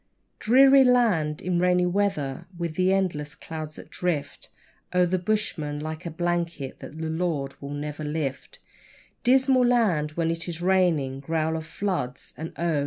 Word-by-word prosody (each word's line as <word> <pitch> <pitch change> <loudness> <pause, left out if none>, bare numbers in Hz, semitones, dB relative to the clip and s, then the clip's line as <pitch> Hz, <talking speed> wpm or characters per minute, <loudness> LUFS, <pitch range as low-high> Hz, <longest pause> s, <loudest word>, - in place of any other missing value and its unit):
Dreary 270 +4 +6
land 210 - +2
in 180 -1 0
rainy 180 0 +3
weather, 175 -6 -1
with 170 -2 -3
the 185 +3 +2
endless 170 -7 -1
clouds 155 -2 -7
that - - -12
drift 170 -5 -3 0.5
O'er 180 0 +5
the 180 +1 0
bushman 175 -7 -1
like 155 +3 -5
a - - -2
blanket 170 -4 -2
that 155 - -10
the 160 0 -3
Lord 160 -4 -2
will 140 - -6
never 150 +1 -5
lift 150 - -3 0.7
Dismal 260 +1 +4
land 205 -12 +2
when 165 0 0
it 165 +1 -4
is 165 -1 -4
raining 175 -8 +2
growl 160 +2 -1
of 160 -1 -5
floods, 155 -11 -3
and, 160 +2 -6
oh! 165 -3 +1
165 Hz, 160 wpm, -26 LUFS, 150-185 Hz, 0.7 s, Dreary